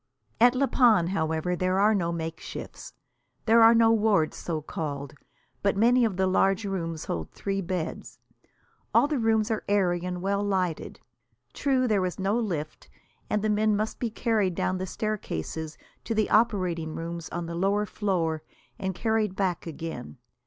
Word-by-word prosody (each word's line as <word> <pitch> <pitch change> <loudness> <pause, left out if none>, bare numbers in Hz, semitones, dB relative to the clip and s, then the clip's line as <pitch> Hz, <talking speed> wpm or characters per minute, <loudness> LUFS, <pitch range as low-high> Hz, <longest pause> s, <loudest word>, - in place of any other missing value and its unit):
At 245 +2 +6
La 275 +2 +3
Panne, 220 -11 +4
however, 160 -1 -1
there 185 +2 0
are 210 +2 +5
no 170 -5 0
makeshifts. 165 -1 -6 0.5
There 230 0 +6
are 225 +1 +8
no 225 0 +5
wards, 210 -8 +2
so 165 -3 -3
called. 145 -2 -5 0.5
But 200 -1 +1
many 240 +4 +4
of 200 -5 -2
the 190 - +2
large 195 +2 +2
rooms 165 -5 -3
hold 80 -2 -4
three 195 -1 -3
beds. 180 -3 -4 0.8
All - - +6
the 295 -3 -1
rooms 225 -1 +2
are 220 - -1
airy 180 -4 +2
and 180 0 -4
well 200 +1 0
lighted. 185 -5 -2 0.5
True, 260 -2 +1
there 205 -4 +2
is 180 -1 -2
no 195 +2 0
lift, 165 -9 -4 0.4
and 210 0 0
the 215 - +1
men 210 0 +2
must 215 +2 -2
be 240 - -1
carried 215 -5 0
down 185 +2 -1
the 185 - -3
staircases 160 - -4 0.3
to 225 - -2
the 215 -1 +1
operating 185 -8 +1
rooms 165 0 -5
on 175 0 -4
the 170 - -6
lower 200 +4 +1
floor, 175 -7 -1 0.4
and 190 -1 -3
carried 220 -2 0
back 185 -4 -1
again. 155 - -7
190 Hz, 165 wpm, -27 LUFS, 170-215 Hz, 0.8 s, are